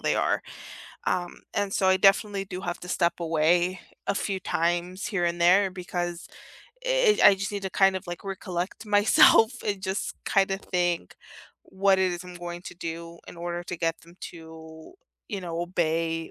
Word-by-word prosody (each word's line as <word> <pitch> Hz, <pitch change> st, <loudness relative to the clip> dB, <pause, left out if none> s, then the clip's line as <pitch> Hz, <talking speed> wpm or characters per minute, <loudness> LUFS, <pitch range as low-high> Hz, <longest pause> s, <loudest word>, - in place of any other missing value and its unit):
they -, -, +1 dB
are, -, -, +1 dB, 0.6 s
um, 175 Hz, -1 st, -2 dB
and 200 Hz, -1 st, -1 dB
so 195 Hz, -, +1 dB
I 190 Hz, -, +5 dB
definitely 195 Hz, +1 st, +3 dB
do 185 Hz, -1 st, -7 dB
have 175 Hz, -2 st, -4 dB
to 180 Hz, -, -10 dB
step 170 Hz, -2 st, +1 dB
away 170 Hz, +3 st, +2 dB, 0.3 s
a 200 Hz, -, +1 dB
few 195 Hz, -1 st, -2 dB
times 175 Hz, +2 st, -1 dB
here 195 Hz, -5 st, 0 dB
and 170 Hz, 0 st, -1 dB
there 190 Hz, +3 st, +5 dB
because 175 Hz, -1 st, -4 dB, 0.6 s
i -, -, -3 dB
it -, -, +4 dB
I 200 Hz, -, +9 dB
just 195 Hz, +1 st, -4 dB
need 200 Hz, -1 st, -4 dB
to 190 Hz, -, -3 dB
kind 195 Hz, 0 st, +3 dB
of 185 Hz, -, -7 dB
like 175 Hz, -1 st, -6 dB
recollect 185 Hz, +1 st, -4 dB
myself 210 Hz, +2 st, +6 dB
and 200 Hz, -2 st, -1 dB
just 190 Hz, +1 st, -3 dB
kinda 195 Hz, -1 st, +2 dB
think 175 Hz, -, -1 dB, 0.5 s
what 195 Hz, 0 st, +2 dB
it 185 Hz, -1 st, +2 dB
is 175 Hz, -, -5 dB
I'm 180 Hz, -, -10 dB
going 175 Hz, 0 st, -7 dB
to 180 Hz, -, -9 dB
do 170 Hz, 0 st, -7 dB
in -, -, -11 dB
order 175 Hz, 0 st, -4 dB
to 180 Hz, -, -5 dB
get 165 Hz, 0 st, -1 dB
them 170 Hz, +1 st, -17 dB, 0.2 s
to, 160 Hz, -1 st, -12 dB, 0.4 s
you 205 Hz, -4 st, -4 dB
know, 170 Hz, -2 st, -4 dB
obey 165 Hz, -2 st, -1 dB
180 Hz, 185 wpm, -26 LUFS, 170-195 Hz, 0.6 s, I